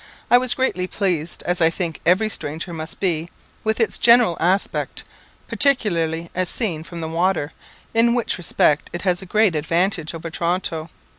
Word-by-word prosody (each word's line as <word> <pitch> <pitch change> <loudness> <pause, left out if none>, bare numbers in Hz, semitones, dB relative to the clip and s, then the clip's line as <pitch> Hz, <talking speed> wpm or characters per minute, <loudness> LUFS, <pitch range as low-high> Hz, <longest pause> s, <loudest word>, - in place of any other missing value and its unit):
I 245 - +8
was 255 -1 +1
greatly 185 -9 0
pleased, 175 -5 -2
as 175 0 -1
I 165 - +5
think 165 -1 -4
every 185 +5 +4
stranger 170 -3 -3
must 160 0 -6
be, 170 -3 -1 0.3
with 220 +1 0
its 225 - +1
general 235 -6 +5
aspect, 185 +4 0 0.4
particularly 170 - +1
as 185 -1 -1
seen 185 -10 -1
from 170 0 -8
the 160 - -3
water, 165 -2 0 0.4
in 235 +1 +3
which 240 -6 -1
respect 150 -3 +1
it 175 - -5
has 180 -1 +1
a 190 - -10
great 210 -2 +2
advantage 165 +1 0
over 165 0 -7
Toronto. 170 -1 -2
175 Hz, 165 wpm, -21 LUFS, 165-205 Hz, 0.4 s, I